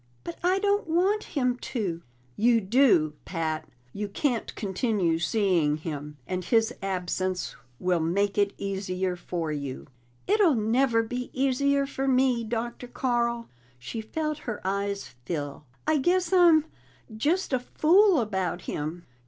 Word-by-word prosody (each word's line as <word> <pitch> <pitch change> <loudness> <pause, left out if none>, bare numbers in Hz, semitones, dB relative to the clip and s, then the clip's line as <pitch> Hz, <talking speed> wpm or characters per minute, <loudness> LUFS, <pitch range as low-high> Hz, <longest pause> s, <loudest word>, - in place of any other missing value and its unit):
"But 170 - -7
I 365 +2 +3
don't 405 -1 +1
want 375 +6 +2
him 250 -2 +2
to!" 195 -11 -3 0.3
"You 235 +1 +4
do, 195 - +4
Pat. 160 -3 -3 0.2
You 210 0 -3
can't 235 +3 -1
continue 190 -4 0
seeing 170 -5 +2
him, 150 -2 -6
and 185 +2 -3
his 225 +1 +2
absence 185 -1 -2 0.2
will 180 -1 +1
make 195 +5 +1
it 200 -1 +2
easier 190 -2 -2
for 170 -2 -3
you." 140 -3 -5 0.4
"It'll 400 -7 +4
never 230 +2 +2
be 245 +2 -4
easier 275 +1 +2
for 275 -1 -3
me, 255 -2 +3
Dr. 235 +2 -4
Carl." 235 -2 -1 0.3
She 220 - -6
felt 305 +6 -3
her 215 - -3
eyes 200 +1 -1 0.2
fill. 145 -3 -4 0.2
"I 310 -1 +3
guess 355 +5 +1
I'm 335 -4 +6 0.5
just 305 +8 0
a 260 - +3
fool 350 +7 +4
about 190 -5 -2
him." 160 +4 -4
220 Hz, 135 wpm, -27 LUFS, 180-270 Hz, 0.5 s, I'm